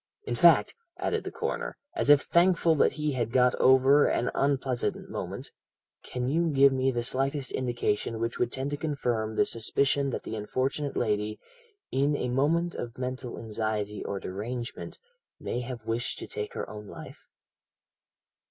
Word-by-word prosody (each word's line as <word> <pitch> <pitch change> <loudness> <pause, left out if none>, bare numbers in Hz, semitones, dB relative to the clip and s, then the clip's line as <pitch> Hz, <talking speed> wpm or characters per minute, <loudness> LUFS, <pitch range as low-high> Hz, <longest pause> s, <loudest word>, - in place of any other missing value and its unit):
In - - -2
fact,' - - +5 0.2
added - - -1
the - - -4
coroner, - - -3 0.2
as 330 - +1
if 145 -1 +8
thankful 170 -1 +4
that 150 - +3
he 150 -1 -1
had 120 -4 -2
got 125 0 +4
over 130 +2 +6
an 120 - 0
unpleasant 135 -3 -1
moment, - - -5 0.5
'can 125 0 -3
you 165 +5 +1
give 140 -2 +5
me 130 0 +1
the 120 -2 -1
slightest 135 +2 -1
indication 120 -3 -1
which 115 +1 -2
would 120 -1 +1
tend 135 +2 -3
to 145 - -2
confirm 120 -8 -2
the - - +3
suspicion 140 +4 +1
that - - -4
the - - -5
unfortunate 130 +7 -2
lady, 105 -1 -1 0.5
in 140 +2 +2
a 125 - -2
moment 160 +7 +1
of 120 -1 -6
mental 125 -1 -4
anxiety 110 -2 -3
or 100 - -3
derangement, 115 +7 -5 0.4
may 120 - -3
have 120 -2 -6
wished 115 +2 -2
to - - -6
take 105 0 -5
her - - -3
own 105 -1 -9
life?' - - -11
125 Hz, 160 wpm, -28 LUFS, 115-140 Hz, 0.5 s, if